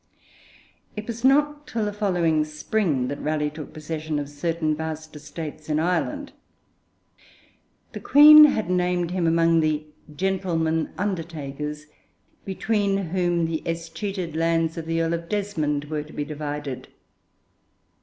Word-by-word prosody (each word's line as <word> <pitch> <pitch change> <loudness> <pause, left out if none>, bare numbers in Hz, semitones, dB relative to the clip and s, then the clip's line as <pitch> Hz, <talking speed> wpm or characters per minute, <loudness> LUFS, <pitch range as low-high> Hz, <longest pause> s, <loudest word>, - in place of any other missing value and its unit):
It 210 0 -5
was 235 +1 -6
not 295 +2 +3
till 225 -2 -2
the 205 - -2
following 175 -7 +1
spring 155 - -1
that 140 - -5
Raleigh 150 -1 -1
took 155 0 -9
possession 155 0 -4
of 145 -1 -3
certain 155 +1 -1
vast 155 0 -6
estates 150 +1 -8
in 150 - +1
Ireland. 180 - -1 1.6
The - - -5
Queen 300 +1 +9
had 220 -9 +1
named 180 -1 0
him 180 -2 0
among 165 0 +4
the 155 -1 0 0.3
'gentlemen 170 -4 0
undertakers,' 150 -6 -4 0.6
between 200 0 0
whom 175 -1 +1
the 160 -1 -2
escheated 170 +1 -4
lands 165 0 +1
of 160 -1 -6
the 165 0 0
Earl 165 +1 0
of 170 0 -4
Desmond 160 -9 -1
were 150 0 -3
to 150 +1 -12
be 145 - -3
divided. 145 -2 -5
165 Hz, 135 wpm, -24 LUFS, 155-190 Hz, 1.6 s, Queen